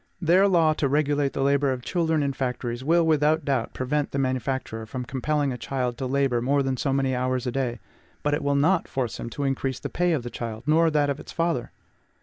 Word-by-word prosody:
Their 185 +3 +4
law 165 -5 +4
to 150 - 0
regulate 145 -1 +1
the 135 - -1
labor 140 0 +2
of 125 -1 -4
children 160 -2 0
in 140 -1 -1
factories 125 -2 -3
will, 165 +3 +3
without 155 0 +2
doubt, 135 -5 -1
prevent 145 +3 -1
the - - -4
manufacturer 130 -4 -2
from 125 +2 -5
compelling 140 +2 -1
a 125 - -7
child 125 -3 -2
to 130 - -2
labor 135 -2 +1
more 140 +3 +2
than 135 -1 0
so 135 +2 -1
many 135 -1 +1
hours 130 0 -1
a 125 - -1
day; 125 -3 -2 0.4
but 145 - +1
it 150 - 0
will 140 0 +1
not 165 +6 +2
force 125 -4 -3
him 115 - -5
to 140 +5 -4
increase 135 -1 -1
the - - -5
pay 175 0 +1
of 140 -6 -1
the 120 - -6
child, 115 0 -5
nor 160 +2 +4
that 145 -2 +2
of 140 - -4
its - - -10
father. 165 -7 -1
140 Hz, 230 wpm, -25 LUFS, 130-150 Hz, 0.4 s, Their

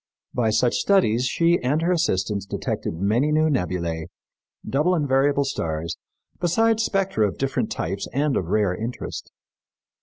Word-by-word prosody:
By 115 -3 +1
such 110 +3 +2
studies 130 - +2
she 170 +5 +2
and 145 +6 0
her 175 - +2
assistants 105 - 0
detected - - -3
many 110 - +1
new 155 +1 +3
nebulæ, 85 - -2 0.6
double 155 +7 +2
and 150 -4 0
variable 140 +1 +2
stars, 85 - -3 0.4
besides 225 +6 +2
spectra 195 - +1
of 95 - -6
different 135 -1 -1
types 95 +5 -3
and 140 +2 0
of 90 - 0
rare 100 -1 +1
interest. 115 +5 -6
130 Hz, 145 wpm, -23 LUFS, 100-155 Hz, 0.6 s, new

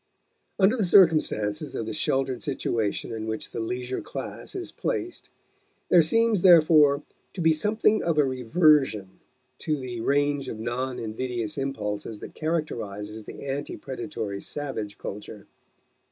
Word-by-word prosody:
Under 200 +4 +4
the 225 - 0
circumstances 155 - +3
of 115 - -3
the 110 - -4
sheltered 135 +2 0
situation 115 -8 -2
in 110 -1 -4
which 110 0 -4
the - - -5
leisure 125 +3 -3
class - - -7
is 370 -2 -5
placed 365 -7 -4 0.6
there 175 - +7
seems, 225 +4 +2
therefore, 155 -5 +6 0.3
to - - -8
be 165 -1 +4
something 210 +6 +2
of 165 -2 0
a 150 - +6
reversion 130 - +2 0.4
to 155 -2 -1
the 125 -3 -5
range 145 +1 +1
of - - -5
non 125 +3 -3
invidious 115 0 -3
impulses 110 -6 -4
that - - -9
characterizes 110 -10 -3
the - - -9
ante 140 +1 -4
predatory 125 -7 -5
savage 120 -8 -5
culture. 105 0 -8
135 Hz, 140 wpm, -26 LUFS, 110-160 Hz, 0.6 s, there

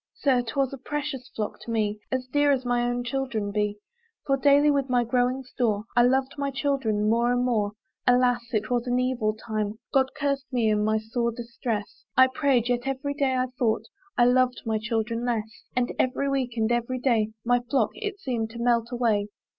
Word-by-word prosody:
Sir! 260 -3 +2
'twas 260 +3 -1
a 275 - -7
precious 275 -2 -4
flock 215 -2 -3
to - - -11
me, 215 -2 0
As 260 -1 -1
dear 290 +3 +2
as 260 -2 0
my 245 0 +1
own 245 0 -1
children 240 -5 -2
be; 210 0 -1 0.5
For 275 - +3
daily 285 +2 +5
with 275 -2 0
my 245 -1 +3
growing 250 +2 +1
store 230 -5 -1
I 240 - +6
loved 265 +3 +2
my 280 0 0
children 270 -7 0
more 235 +2 +3
and 245 0 +1
more. 210 -4 +1 0.3
Alas! 245 0 +4
it 215 +1 -1
was 245 0 0
an 245 0 +1
evil 245 -4 0
time; 215 -1 -3 0.2
God 265 -1 +4
cursed 280 -2 -1
me 235 -4 +2
in 210 0 +2
my 215 +1 +2
sore 235 +2 -1
distress, 230 -2 -5
I 260 0 +7
prayed, 260 -5 +2
yet 245 +1 0
every 270 +1 -2
day 275 -3 +1
I 255 - +2
thought 225 -3 +1 0.3
I 240 - +6
loved 250 0 +3
my 220 -1 0
children 230 +1 -1
less; 225 -3 -3
And 250 0 +1
every 260 +2 +1
week, 260 -3 -1
and 220 +1 +1
every 240 +2 0
day, 230 -4 +1
My 245 +1 +4
flock, 245 -2 0
it 415 -2 -4
seemed 235 - -2
to 235 +1 -9
melt 235 -1 +2
away. 225 -4 +1
245 Hz, 200 wpm, -26 LUFS, 225-265 Hz, 0.5 s, I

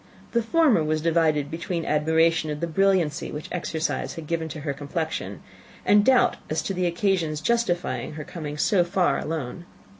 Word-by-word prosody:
The 235 - +2
former 250 - +3
was 155 0 0
divided 155 -3 +1
between 170 +1 -3
admiration 160 +1 +2
of 150 0 -3
the 170 - -1
brilliancy 170 -3 +1
which 150 - -6
exercise 165 -2 -2
had 165 - -7
given 165 0 -2
to 150 +1 -7
her 145 -2 -2
complexion 155 +3 -4 0.4
and 205 0 +5
doubt 260 +2 +4
as 155 - -1
to 195 - -2
the 180 -1 0
occasion's 170 -4 0
justifying 175 - -1
her 150 0 -6
coming 150 -2 -6
so 180 +4 +3
far 175 +1 +1
alone. 160 +2 -4
165 Hz, 170 wpm, -25 LUFS, 155-180 Hz, 0.4 s, and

